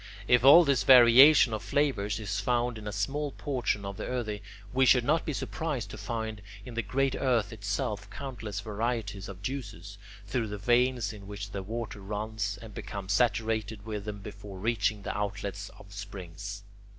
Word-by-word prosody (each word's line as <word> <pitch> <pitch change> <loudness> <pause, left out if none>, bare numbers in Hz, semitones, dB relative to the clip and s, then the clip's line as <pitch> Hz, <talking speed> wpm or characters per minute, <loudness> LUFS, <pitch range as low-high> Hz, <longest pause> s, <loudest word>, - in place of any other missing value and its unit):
If 125 -1 +5
all 145 +6 +9
this 140 -3 +2
variation 125 +1 +8
of 110 - -2
flavours 115 -8 0
is 105 -2 -3
found 120 +2 0
in 105 - -8
a - - -3
small 145 +5 -2
portion 120 -7 -2
of 100 0 -6
the - - -5
earthy, 110 -5 -3 0.3
we 130 +1 +3
should 125 -1 +5
not 155 +5 +2
be - - 0
surprised 135 -7 -3
to - - -8
find 110 -3 -4 0.2
in 125 - -8
the 115 - -1
great 135 +5 0
earth 120 -5 +1
itself 105 0 -3
countless 110 -5 -6
varieties 105 -2 -3
of 95 0 -10
juices, 100 -6 -6 0.3
through 115 +2 -1
the 105 0 -5
veins 120 +1 +2
of 100 -2 -11
which 100 0 -7
the 100 - -4
water 110 +1 -5
runs, 105 +1 -3
and 110 -2 -10
becomes 100 0 -4
saturated 110 -2 0
with 105 -2 -5
them 105 -1 -6
before 100 -1 -9
reaching 105 0 0
the - - -4
outlets 100 0 -4
of 100 0 -14
springs. 100 0 -7
110 Hz, 175 wpm, -29 LUFS, 100-125 Hz, 0.3 s, all